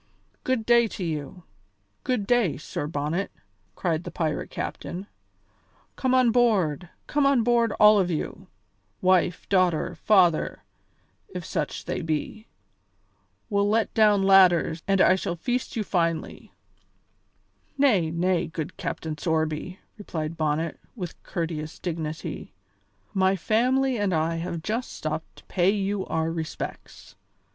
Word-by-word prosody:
"Good 255 -4 0
day 235 0 +5
to 190 - -3
you! 160 +1 -4 0.6
Good 250 -6 0
day, 235 -7 +2
Sir 145 - -5
Bonnet," 155 +5 -2 0.5
cried 165 -2 -1
the - - -6
pirate 155 -3 -2
captain; 185 +3 -5 0.9
"come 260 -1 +1
on 255 -2 +4
board, 190 - +2 0.2
come 290 -1 +2
on 270 -4 +3
board, 235 -1 +3
all 210 0 +6
of 185 -2 +1
you, 160 -3 -4 0.5
wife, 180 -1 +2
daughter, 185 -5 +2
father, 180 -6 +2 0.7
if - - -6
such - - -3
they - - -3
be! 160 +8 -3 1.0
We'll 200 -1 +1
let 220 +1 +1
down 210 -3 +4
ladders 180 -4 +5
and 195 -1 +2
I 185 - +6
shall 180 -2 -2
feast 245 +8 -2
you 220 - 0
finely." 165 -4 -2 1.3
"Nay, 215 - +3
nay, 175 +1 0
good 160 -1 -6
Captain 160 -1 -4
Sorby," 160 +2 -1 0.2
replied 160 -5 -4
Bonnet, 155 0 -1 0.2
with 180 -7 -7
courteous 160 -3 -4
dignity, 160 -2 -5 0.6
"my 190 0 +3
family 250 +6 +1
and 200 -4 +1
I 160 +1 0
have 170 -1 -4
just 230 +6 -3
stopped - - -5
to - - -16
pay 180 0 +2
you 200 -1 -1
our 160 +1 -1
respects. 160 -1 -6
185 Hz, 130 wpm, -26 LUFS, 160-215 Hz, 1.3 s, all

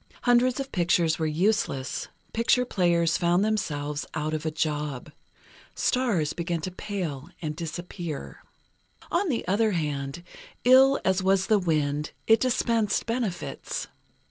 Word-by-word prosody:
Hundreds 245 +2 +3
of 270 0 -4
pictures 170 -2 +2
were 160 - +1
useless; 155 -5 0 0.3
picture 235 +2 +3
players 170 -6 +2
found 175 +3 +3
themselves 150 -9 -2
"out 155 0 -2
of 155 +1 -2
a - - +2
job." 150 -3 -3 0.6
Stars 225 - +1
began 170 0 -2
to 185 - -4
pale 180 -7 -5
and 155 -2 -4
disappear. 170 -1 -6 0.7
On 355 +2 +1
the 240 -9 -2
other 210 +3 +2
hand, 145 -1 -3 0.4
ill 265 +2 +6
as 190 0 +2
was 190 0 +3
the 215 -2 +3
wind, 150 -4 0
it 225 0 +5
dispensed 230 -4 +1
benefits. 225 -6 -3
175 Hz, 130 wpm, -26 LUFS, 155-220 Hz, 0.7 s, ill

